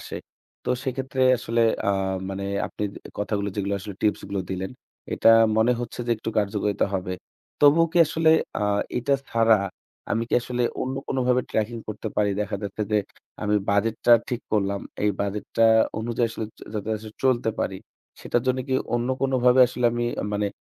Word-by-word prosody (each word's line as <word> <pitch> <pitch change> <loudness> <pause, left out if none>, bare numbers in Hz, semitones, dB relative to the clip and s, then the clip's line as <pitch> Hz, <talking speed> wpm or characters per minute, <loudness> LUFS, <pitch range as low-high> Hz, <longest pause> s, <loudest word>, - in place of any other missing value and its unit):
আসে। - - -7 0.5
তো - - -1
সেক্ষেত্রে 130 0 -2 0.2
আসলে 115 0 0 0.2
অ্যা - - +1 0.4
মানে 100 0 -4 0.2
আপনি - - -5 0.3
কথাগুলো 100 0 -1
যেগুলো 100 0 -1
আসলে 100 +1 -7
টিপসগুলো 100 -2 0
দিলেন, 95 0 -3 0.4
এটা - - +3 0.3
মনে 110 +3 +4
হচ্ছে 120 0 -5
যে 120 - -1
একটু 110 - -4
কার্যকরিতা 105 -1 0
হবে। 95 -1 -2 0.5
তবুও 150 +3 +6
কি 175 - +3
আসলে 160 +1 +2 0.3
আ - - 0 0.4
এটা 140 +3 +1 0.2
ছাড়া 115 -1 +5 0.6
আমি 115 - +1
কি - - 0
আসলে 125 0 -2 0.2
অন্য 130 +1 -3
কোনভাবে 125 -1 +1
ট্র্যাকিং 110 +2 -1
করতে 110 +1 -4
পারি? 105 -1 +2
দেখা 105 -1 -2
যাচ্ছে 100 +1 -3
যে, - - +4 0.5
আমি 105 0 +1 0.2
বাজেটটা 110 +3 +2 0.2
ঠিক 125 -1 -2
করলাম। 100 -2 +1 0.2
এই 105 - +3
বাজেটটা 105 +3 0 0.3
অনুযায়ী 115 +1 0
আসলে 115 - -4 0.2
যা - - -11
যাতে 105 0 -3
আসলে 110 0 -10
চলতে 120 -3 +2
পারি 95 - -2 0.4
সেটার 120 - 0
জন্য 130 0 +2
কি 130 - +1 0.2
অন্য 120 +1 0
কোনোভাবে 130 -1 +4
আসলে 125 0 -4
আমি 120 0 -1 0.3
মানে 105 0 0
115 Hz, 165 wpm, -24 LUFS, 105-125 Hz, 0.6 s, তবুও